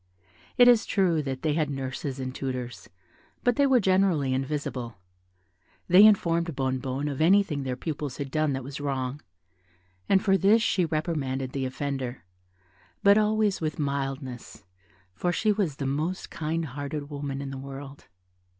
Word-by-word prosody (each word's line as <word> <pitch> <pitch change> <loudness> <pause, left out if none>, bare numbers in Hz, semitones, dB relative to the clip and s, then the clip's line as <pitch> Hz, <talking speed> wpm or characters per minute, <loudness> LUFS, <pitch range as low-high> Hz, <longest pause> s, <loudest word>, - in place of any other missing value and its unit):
It 245 - +8
is 235 -2 +5
true 180 -6 +2
that 135 -2 -5
they 155 -2 +1
had 155 -1 0
nurses 135 0 -4
and 130 -1 -4
tutors, 125 -5 -5 0.5
but 245 -1 +3
they 280 +2 +3
were 260 -2 +5
generally 185 - +2
invisible. 130 -5 -3 0.9
They 185 +3 +8
informed 170 -6 +2
Bonnebonne 130 +1 -2
of 140 0 -3
anything 175 -4 +3
their 130 -2 -3
pupils 145 -1 -5
had 140 -2 -5
done 155 -1 +1
that 135 -1 -3
was 140 +2 -7
wrong, 135 0 -3 0.9
and 195 - +5
for 195 -1 +4
this 215 +4 +4
she 185 -6 +2
reprimanded 150 -5 -2
the 135 -1 -2
offender, 130 -4 -4 0.8
but 200 +1 +6
always 215 -2 +1
with 155 -2 -2
mildness, 135 -3 -4 0.5
for 175 - -1
she 215 +4 +1
was 195 -9 0
the 140 - -4
most 155 +7 -2
kind 165 +1 -2
hearted 145 +1 -5
woman 140 -1 -4
in 140 -1 -5
the 135 - -6
world. 135 +1 -9
145 Hz, 155 wpm, -27 LUFS, 135-175 Hz, 0.9 s, It